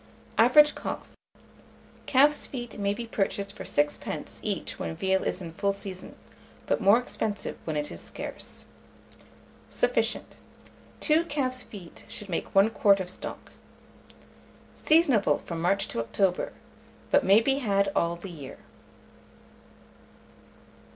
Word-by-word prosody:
Average 295 +6 +7
cost. - - -6 1.0
Calf's 290 +3 +4
feet 240 -5 -7
may 200 0 +1
be 235 - -5
purchased 200 -2 -2
for - - -7
6d. 145 0 -2
each - - -3
when 80 -1 -3
veal 190 0 +1
is 185 - -2
in 165 -2 -7
full 200 +3 0
season, 195 -2 -8 0.5
but - - 0
more 200 +3 +6
expensive 220 -4 -3
when 155 -2 -2
it 150 0 -2
is - - -8
scarce. - - -8 1.0
Sufficient. - - 0 0.6
2 320 +2 +3
calf's 260 -5 -1
feet 190 -8 -11
should 210 - -8
make 170 - -3
1 200 +3 +6
quart 200 -3 +4
of 180 -1 -4
stock. - - -8 1.2
Seasonable 300 -10 +4
from 165 -1 -4
March 195 +3 +2
to - - -2
October, 180 - 0 0.6
but 285 - +5
may 200 0 +6
be 270 +4 +1
had 200 -5 +1
all 170 0 +1
the 175 +2 -9
year. 145 -6 -9
200 Hz, 130 wpm, -27 LUFS, 185-250 Hz, 1.2 s, Average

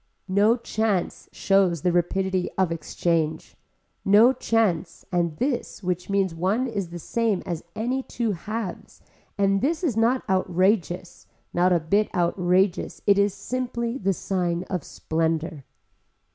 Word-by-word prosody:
No 210 +4 +4
chance 220 -5 -2
shows 190 -5 +2
the 180 - +3
rapidity 185 +1 0
of 185 -3 +2
exchange, 165 -1 -1 0.5
no 215 +6 +6
chance 210 -9 0
and 170 -3 0
this 250 -5 -2
which 180 0 -2
means 195 -3 +1
one 190 +9 0
is 200 -8 -3
the 175 - -7
same 220 +3 -1
as 170 -3 -4
any 250 +4 -1
two 235 -3 -2
halves 205 +2 -6 0.3
and 195 -1 +2
this 315 +5 0
is 285 -10 +1
not 235 +3 +2
outrageous, 185 -1 0 0.3
not 180 +1 +3
a 175 - +4
bit 200 +7 +1
outrageous 180 +2 +1
it 200 -1 +5
is 200 -1 +2
simply 245 -1 -3
the 195 -1 +1
sign 180 -2 -1
of 180 -6 -2
splendor. 160 -3 -2
190 Hz, 135 wpm, -25 LUFS, 175-220 Hz, 0.5 s, no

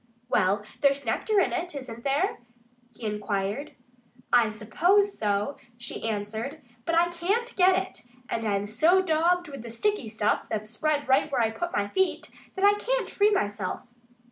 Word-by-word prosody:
"Well, 200 -1 +2 0.2
there's 280 -1 +2
nectar 405 - +1
in 375 - +2
it, 355 -3 -3
isn't 240 -4 -7
there?" 285 +7 0 0.6
he 230 - -8
inquired. 210 +6 -2 0.6
"I 235 -3 +6
suppose 350 - +2
so," 205 +6 -1 0.2
she 240 -1 -4
answered. 220 +8 -4 0.2
"But 335 - +1
I 345 +1 +4
can't 395 +8 -1
get 370 0 +5
it. 380 0 -4 0.3
And 225 - -2
I'm 205 -2 0
so 330 - +3
daubed 350 +1 +2
with 275 -4 -7
the 235 - -8
sticky 260 - -1
stuff 215 -1 0
that's 215 0 -3
spread 290 +4 0
right 265 +3 +3
where 270 - +1
I 225 -1 +2
put 345 +10 -4
my 205 -7 0
feet 380 - 0 0.2
that 385 +1 +2
I 405 - +7
can't - - -1
free 410 +1 +4
myself." 205 - -1
280 Hz, 170 wpm, -27 LUFS, 215-360 Hz, 0.6 s, I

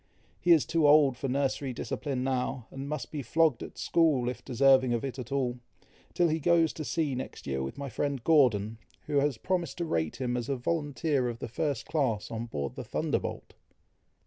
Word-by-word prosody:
He 175 - +2
is 160 -4 +6
too 160 -2 +2
old 145 -3 +6
for 135 +3 -4
nursery 135 0 -1
discipline 130 +1 -3
now, 130 -2 -1
and 135 +1 -6
must 150 -5 -4
be 150 - -3
flogged 150 +1 +2
at - - -8
school, 150 -7 +2
if 125 - -6
deserving 130 -1 +4
of 115 - -2
it 135 -1 -5
at 125 +1 -7
all, 125 -3 -1 0.6
till 175 - +4
he 160 0 0
goes 165 0 +3
to 155 - -5
sea 150 -2 -1
next 130 +1 -6
year 65 -1 -2
with 65 - -5
my 140 0 -4
friend 135 +1 -2
Gordon, 115 -8 +3 0.3
who 145 - 0
has 140 -3 +1
promised 175 0 -2
to 170 - -2
rate 80 - -1
him 125 -2 -2
as 120 0 -3
a 140 - +1
volunteer 145 -1 -1
of 115 - -5
the - - -5
first 140 -2 -2
class, 130 -10 -1
on 115 +1 -4
board 70 -10 -4
the - - -6
Thunderbolt." - - -3
135 Hz, 200 wpm, -29 LUFS, 120-150 Hz, 0.6 s, is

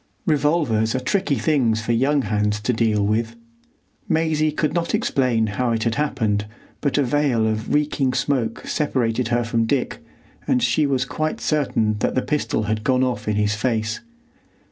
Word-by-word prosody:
Revolvers 145 -8 +1
are - - +1
tricky 165 +3 0
things 125 -9 +1
for 120 - -1
young 135 +4 +2
hands 105 0 0
to 125 +4 0
deal 110 -3 +1
with. 115 +2 -1 0.7
Maisie 155 -1 +1
could 155 0 -1
not 170 +3 0
explain 130 - +1
how 115 +4 -1
it 110 -1 -1
had 115 - +1
happened, 110 -8 0 0.4
but 145 -1 0
a 145 - +3
veil 130 -3 +1
of 110 0 -2
reeking 145 -3 +1
smoke 125 -3 -1
separated 125 -5 0
her 120 0 +1
from 115 0 0
Dick, 125 +3 -1 0.5
and 125 - +2
she 145 +5 +2
was 130 -2 0
quite 155 +3 -3
certain 115 -8 0
that - - 0
the 130 - +1
pistol 150 -7 -1
had 105 0 -2
gone 130 +1 +2
off 125 -3 -2
in 105 - +1
his 105 0 +1
face. 110 0 -1
125 Hz, 170 wpm, -22 LUFS, 110-145 Hz, 0.7 s, a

